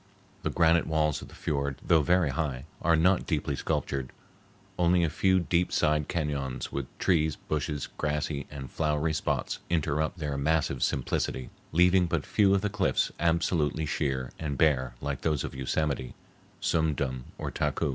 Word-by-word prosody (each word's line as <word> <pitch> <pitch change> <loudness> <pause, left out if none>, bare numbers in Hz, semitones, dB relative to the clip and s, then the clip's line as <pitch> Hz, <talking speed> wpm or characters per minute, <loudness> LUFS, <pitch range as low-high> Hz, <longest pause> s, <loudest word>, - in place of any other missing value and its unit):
The - - -1
granite 85 0 +3
walls 75 -2 +1
of - - -9
the - - -14
fiord, 70 -2 -1
though 80 -2 +5
very 85 0 +3
high, 70 -2 -2 0.2
are 85 0 +4
not 90 +4 +3
deeply 75 -3 0
sculptured. 65 -1 -2 0.7
Only 85 0 +4
a 80 - +1
few 95 +3 +3
deep 85 0 +1
side 75 -1 +1
cañons 70 -6 -2
with 70 -2 -3
trees, 80 -4 +2
bushes, 75 -2 -3
grassy 75 -1 -2
and 65 -3 -8
flowery 80 0 0
spots 75 - -1
interrupt 80 0 0
their 75 -4 -3
massive 70 -3 +1
simplicity, 65 -1 -1 0.2
leaving 90 +2 +4
but - - -1
few 100 -2 +4
of 95 - +1
the 105 - 0
cliffs 100 -1 +1
absolutely 80 -2 +1
sheer 65 -3 -1
and 75 -4 -3
bare 65 -5 +2
like 70 -1 -3
those 75 -3 0
of - - -5
Yosemite, 65 0 -2 0.4
Sum 80 -2 +1
Dum, 65 -3 -3
or - - -4
Taku. - - 0
75 Hz, 160 wpm, -28 LUFS, 70-85 Hz, 0.7 s, though